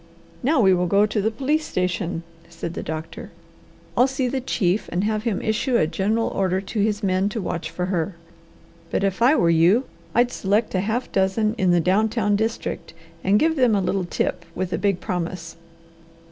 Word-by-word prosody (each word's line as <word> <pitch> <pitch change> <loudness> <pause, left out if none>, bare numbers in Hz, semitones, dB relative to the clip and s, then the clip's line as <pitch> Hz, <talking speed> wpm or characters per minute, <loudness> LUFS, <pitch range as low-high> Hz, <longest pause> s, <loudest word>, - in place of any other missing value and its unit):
"Now 285 +3 +2
we 190 -4 +5
will 180 0 +1
go 200 +3 +4
to 215 0 -1
the 215 - +1
police 275 +7 0
station," 180 - -2 0.3
said 170 0 -6
the - - -4
doctor. 160 +1 -6 0.7
"I'll 250 - +5
see 265 -1 -1
the 260 +1 -2
chief 195 -5 0
and 175 +3 0
have 215 +1 -1
him 220 -5 0
issue 235 +3 +1
a - - +3
general 205 +7 0
order 190 -1 0
to 195 +3 -5
his 210 +1 0
men 190 +1 +1
to 225 +1 -4
watch 170 -4 -3
for 180 - -3
her, 180 0 -2 0.7
but - - -1
if 195 +2 -1
I 260 +6 +6
were 170 - +3
you 175 +9 +4 0.3
I'd 245 +1 +3
select 210 +2 0
a 185 - +1
half 220 +6 -2
dozen 195 +3 +1
in 185 - +2
the 175 0 +4
down 195 +6 +2
town 210 -2 +1
district, 225 +2 -3 0.3
and 195 +2 +4
give 320 +6 +2
them 250 -6 +3
a - - +2
little 190 0 -1
tip - - -2
with 185 0 -3
a - - -1
big 200 -3 0
promise!" 170 -1 -4
200 Hz, 200 wpm, -23 LUFS, 180-225 Hz, 0.7 s, I